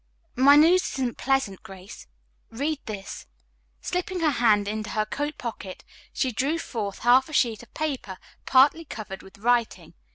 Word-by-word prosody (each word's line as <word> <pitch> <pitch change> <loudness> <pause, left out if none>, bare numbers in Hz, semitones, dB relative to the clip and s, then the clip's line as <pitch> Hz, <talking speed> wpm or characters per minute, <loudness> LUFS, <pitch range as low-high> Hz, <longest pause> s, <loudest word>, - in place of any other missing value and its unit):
"My 275 +3 +6
news 335 +5 +6
isn't 255 -3 -3
pleasant, 265 -8 0
Grace. 190 +1 -12 0.4
Read 285 +6 -2
this." 200 -3 -7 0.5
Slipping 360 0 -3
her 310 -2 +3
hand 215 -6 +2
into 215 0 -4
her 215 -1 -1
coat 290 +6 -4
pocket 220 -6 -7 0.3
she 260 - -1
drew 275 +9 -1
forth 215 -10 -5
a - - -11
half 255 +5 +4
sheet 230 -4 +1
of 240 - -17
paper 270 -11 -4 0.3
partly 275 +5 +5
covered 210 -9 -8
with 190 - -16
writing. 235 +2 0
245 Hz, 155 wpm, -25 LUFS, 215-290 Hz, 0.5 s, My